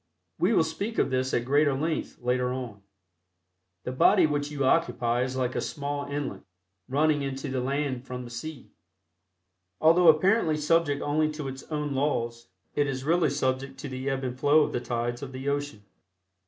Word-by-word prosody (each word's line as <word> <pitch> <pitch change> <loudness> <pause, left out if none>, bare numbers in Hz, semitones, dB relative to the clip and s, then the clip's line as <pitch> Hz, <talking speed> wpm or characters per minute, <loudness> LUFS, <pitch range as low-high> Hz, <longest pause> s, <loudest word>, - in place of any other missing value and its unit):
We - - +3
will 170 - +4
speak 200 +8 -4
of - - +2
this 130 0 0
at 120 - 0
greater 145 +1 +3
length 155 +4 -2
later 125 0 0
on. 125 -6 -5 1.0
The 125 - -3
body 175 +8 +5
which 145 -1 -1
you 145 -2 -2
occupy 125 -6 +2
is 130 0 -2
like 125 -1 -1
a - - -1
small 145 -1 -4
inlet 140 -8 -4 0.5
running 150 +2 +2
in 135 -1 -3
to 135 - -5
the 130 -1 -1
land 135 -1 -2
from 125 0 -5
the 120 - -10
sea. 135 +3 -7 1.1
Although 165 +2 +5
apparently 160 +1 +4
subject 150 -1 +1
only 155 +1 +1
to 150 -2 -5
its 135 0 -6
own 150 -2 -2
laws, 120 -4 -1 0.3
it 145 0 +1
is 130 -1 -3
really 170 +4 +3
subject 135 -1 -1
to 145 - -5
the 130 +1 -3
ebb 135 0 -2
and 125 0 -4
flow 145 +2 +5
of - - -2
the 120 - -2
tides 120 +1 -2
of 135 -2 -7
the 130 +2 -6
ocean. 145 -6 -3
140 Hz, 185 wpm, -27 LUFS, 130-150 Hz, 1.1 s, body